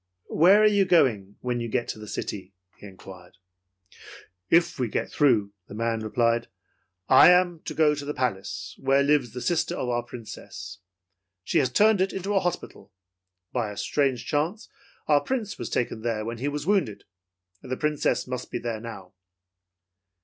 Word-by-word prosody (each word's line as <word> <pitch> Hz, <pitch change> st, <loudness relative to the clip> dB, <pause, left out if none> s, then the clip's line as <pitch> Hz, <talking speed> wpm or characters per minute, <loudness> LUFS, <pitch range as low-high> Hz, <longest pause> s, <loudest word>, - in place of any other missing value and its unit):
"Where 195 Hz, +7 st, +6 dB
are -, -, +7 dB
you 205 Hz, -2 st, +4 dB
going 110 Hz, -, +2 dB
when 125 Hz, -1 st, -2 dB
you 115 Hz, -, -3 dB
get 120 Hz, +1 st, -1 dB
to -, -, -5 dB
the 105 Hz, -, -9 dB
city?" 95 Hz, -2 st, -6 dB, 0.2 s
he 105 Hz, -, -11 dB
inquired. 95 Hz, -1 st, -13 dB, 1.1 s
"If 170 Hz, -3 st, +3 dB
we 125 Hz, -, +1 dB
get -, -, -3 dB
through," 110 Hz, -9 st, +2 dB
the 100 Hz, -, -10 dB
man 115 Hz, 0 st, -1 dB
replied, 115 Hz, +2 st, 0 dB, 0.6 s
"I 130 Hz, -, +8 dB
am 180 Hz, -2 st, +3 dB
to -, -, -5 dB
go 155 Hz, -2 st, +4 dB
to 145 Hz, -1 st, -5 dB
the 145 Hz, +1 st, -4 dB
palace 100 Hz, -7 st, -3 dB
where 135 Hz, +1 st, +3 dB
lives 140 Hz, -5 st, +1 dB
a 125 Hz, -, -4 dB
sister 170 Hz, +2 st, 0 dB
of 125 Hz, -, -3 dB
our 120 Hz, 0 st, 0 dB
Princess. 100 Hz, -5 st, -10 dB, 0.6 s
She -, -, +1 dB
has 130 Hz, -, +1 dB
turned 210 Hz, -, +4 dB
it 190 Hz, -, 0 dB
into 195 Hz, +2 st, -3 dB
a 195 Hz, -, +4 dB
hospital. 175 Hz, -, -5 dB, 0.6 s
By 120 Hz, -4 st, -1 dB
a 105 Hz, -, -9 dB
strange 135 Hz, -5 st, 0 dB
chance, 160 Hz, -, -2 dB, 0.4 s
our 145 Hz, -2 st, +4 dB
Prince 235 Hz, -6 st, -3 dB
was -, -, -4 dB
taken 115 Hz, -2 st, -2 dB
there 110 Hz, -2 st, -2 dB
when 115 Hz, 0 st, -5 dB
he 135 Hz, -, -2 dB
was 145 Hz, 0 st, -3 dB
wounded. 170 Hz, -, 0 dB, 0.6 s
The 130 Hz, 0 st, -5 dB
Princess 150 Hz, -1 st, 0 dB
must, 125 Hz, -1 st, -5 dB
be -, -, -3 dB
there 115 Hz, -2 st, -4 dB
now.' 100 Hz, -6 st, -9 dB
125 Hz, 175 wpm, -26 LUFS, 110-155 Hz, 1.1 s, I